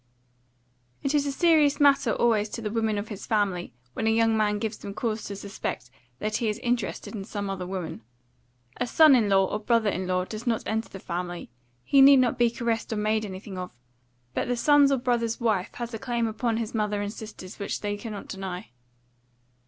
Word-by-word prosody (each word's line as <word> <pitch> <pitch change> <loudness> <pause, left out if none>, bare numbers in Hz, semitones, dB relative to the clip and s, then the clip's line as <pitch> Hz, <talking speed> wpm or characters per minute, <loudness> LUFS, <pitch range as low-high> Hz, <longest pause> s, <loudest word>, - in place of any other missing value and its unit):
It 275 - 0
is 290 -1 +2
a - - 0
serious 300 -2 +4
matter 285 -1 +4
always 220 -3 +2
to 230 - -6
the 210 - -2
women 220 -2 0
of 205 +1 -4
his 205 -3 -7
family 200 -5 0 0.2
when 220 - -1
a - - +5
young 225 0 +3
man 210 -1 +2
gives 215 +1 -3
them 200 0 -7
cause 220 -2 -2
to 200 - -5
suspect 195 -10 -5 0.3
that 215 +6 -1
he 230 - 0
is 210 - -2
interested 240 0 -2
in 205 -3 -5
some 200 -1 -4
other 185 -2 -4
woman. 185 -10 -5 0.8
A - - -1
son 310 +3 +7
in 220 -5 +2
law 195 -1 +4
or 210 - -3
brother 220 -1 +2
in 185 0 -3
law 185 0 0
does 220 +4 -7
not 230 -2 +1
enter 220 +1 -2
the - - -8
family; 175 -4 -5 0.3
he 275 - +5
need 275 0 +9
not 250 -2 +2
be 240 -1 +5
caressed 230 -1 -2
or - - 0
made 215 +1 +1
anything 190 -1 -7
of; 180 - -5 0.6
but - - -1
the 245 0 0
son's 290 +2 +5
or 275 - +3
brother's 240 -2 0
wife 215 -6 0
has 240 -1 -5
a 225 - -4
claim 240 -2 -1
upon 225 +1 -1
his 225 -1 -3
mother 210 -2 0
and 205 +1 -4
sisters 215 -3 -10
which 200 - -3
they 205 0 -2
cannot 205 -1 -7
deny. 190 -6 -6
220 Hz, 210 wpm, -26 LUFS, 200-235 Hz, 0.8 s, need